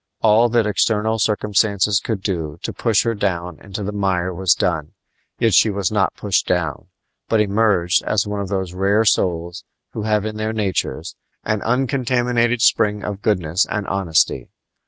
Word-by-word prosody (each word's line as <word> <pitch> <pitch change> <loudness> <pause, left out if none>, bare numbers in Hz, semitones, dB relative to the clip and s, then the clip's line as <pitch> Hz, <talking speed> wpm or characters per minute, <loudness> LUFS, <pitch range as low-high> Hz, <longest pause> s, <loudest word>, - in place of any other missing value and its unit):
All 115 +2 +4
that 115 -1 +2
external 110 +2 +1
circumstances 105 -1 +1
could 110 -5 -4
do 80 -7 -3
to - - -4
push 110 -3 +1
her 115 - 0
down 90 -5 -3
into 100 +1 -7
the 100 - -3
mire 95 -3 -1
was 95 +1 +2
done; 80 -4 -2 0.4
yet 115 -3 +1
she 110 - +5
was 100 -2 -1
not 105 -3 0
pushed 100 -3 0
down, 80 -6 -2 0.4
but 110 - +2
emerged 100 -4 +2
as 105 -3 +1
one 105 0 -4
of 100 - -3
those 95 -3 -3
rare 100 +4 +2
souls 85 -4 0 0.3
who 110 - -5
have 105 -1 0
in 110 0 -4
their 110 +1 -2
natures 95 -7 -2 0.3
an 110 -2 -1
uncontaminated 125 -2 0
spring 105 -1 +2
of 100 -1 -5
goodness 90 -4 +1
and 105 -1 -2
honesty. 95 -5 0
105 Hz, 165 wpm, -20 LUFS, 90-110 Hz, 0.4 s, she